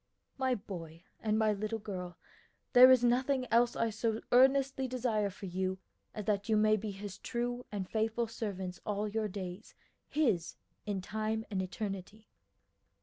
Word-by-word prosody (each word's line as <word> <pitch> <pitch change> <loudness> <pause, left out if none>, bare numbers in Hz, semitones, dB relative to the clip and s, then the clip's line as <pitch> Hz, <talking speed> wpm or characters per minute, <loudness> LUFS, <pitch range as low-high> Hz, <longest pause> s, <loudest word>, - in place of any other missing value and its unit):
"My 260 -1 +1
boy, 170 -6 -8 0.2
and 215 -1 +1
my 215 -1 +3
little 215 +2 -2
girl, 185 -4 -6 0.6
there 250 0 +10
is 255 -2 +6
nothing 255 +2 +2
else 235 +1 +4
I 230 -1 +1
so 225 0 -1
earnestly 265 +1 +4
desire 230 -5 0
for 195 +1 -9
you 185 +1 -2 0.4
as 210 -2 -5
that 205 +1 0
you 215 - +4
may 215 0 +5
be 215 0 -4
His 200 -1 -7
true 245 +1 -3
and 200 -3 -3
faithful 225 +2 0
servants 195 -5 -5
all 210 0 -1
your 215 +1 -1
days, 190 0 -7 0.3
His 225 - +1 0.3
in 200 -2 -1
time 220 +3 -2
and 190 -2 0
eternity." 195 +2 -6
215 Hz, 155 wpm, -33 LUFS, 195-235 Hz, 0.6 s, there